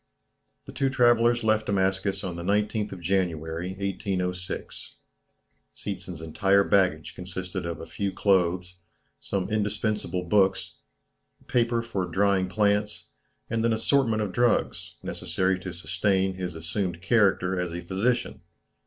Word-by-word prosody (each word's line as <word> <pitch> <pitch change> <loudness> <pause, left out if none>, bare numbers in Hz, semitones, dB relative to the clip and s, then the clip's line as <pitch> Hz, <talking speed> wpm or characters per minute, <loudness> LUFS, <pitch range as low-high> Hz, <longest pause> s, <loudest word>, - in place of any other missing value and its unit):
The - - -9
two 135 -1 0
travellers 120 -2 +4
left 110 0 +2
Damascus 95 0 0
on 90 -2 -4
the 85 - -5
19th 105 +3 0
of 95 - -8
January, 85 -2 -1
1806. 95 -2 -4 0.8
Seetzen's 90 -4 -6
entire 95 +5 +3
baggage 90 -7 +2
consisted 90 0 -5
of 85 - -4
a - - -7
few 95 +4 -3
clothes, 90 -2 +1 0.4
some 95 -2 -2
indispensable 105 -3 -1
books, 95 +1 +1 0.7
paper 115 -1 +1
for 100 -6 -2
drying 95 +1 +2
plants, 105 +1 0 0.4
and 115 0 -1
an 115 -1 +3
assortment 110 -1 +2
of 100 - -3
drugs, 120 +3 +1
necessary 95 0 -1
to 90 0 -6
sustain 95 +2 0
his 90 -2 -5
assumed 85 +2 -3
character 95 -4 +3
as 90 -1 -3
a 85 +1 -4
physician. 100 +8 -1
95 Hz, 125 wpm, -26 LUFS, 90-105 Hz, 0.8 s, travellers